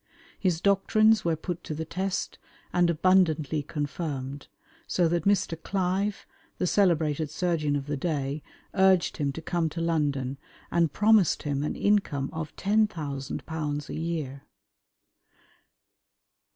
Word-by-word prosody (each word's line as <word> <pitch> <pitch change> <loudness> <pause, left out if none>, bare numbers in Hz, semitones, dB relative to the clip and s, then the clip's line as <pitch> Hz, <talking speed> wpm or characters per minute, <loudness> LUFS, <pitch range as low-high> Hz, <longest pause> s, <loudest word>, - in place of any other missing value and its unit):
His 175 -4 +1
doctrines 215 +2 +4
were 165 -1 +1
put 175 +2 -5
to 155 - -5
the 160 +2 -4
test 185 +4 -3 0.3
and 175 -1 +3
abundantly 160 -3 +3
confirmed, 145 -2 -4 0.4
so 175 -2 +2
that 170 0 0
Mr. 190 -5 +1
Clive, 195 +2 -1 0.3
the - - 0
celebrated 160 -6 +2
surgeon 155 -3 0
of 140 -1 -2
the 145 0 -2
day, 145 -1 -2 0.3
urged 190 -2 +3
him 145 -2 0
to 165 - -7
come 170 -1 0
to 165 - -6
London, 145 -5 0 0.3
and 170 -3 +2
promised 210 -2 +4
him 140 -2 -1
an 150 - -2
income 195 -10 +1
of 160 -1 -5
£10,000 155 -6 -1
a - - -5
year. 155 -5 -3
165 Hz, 125 wpm, -27 LUFS, 145-185 Hz, 0.4 s, doctrines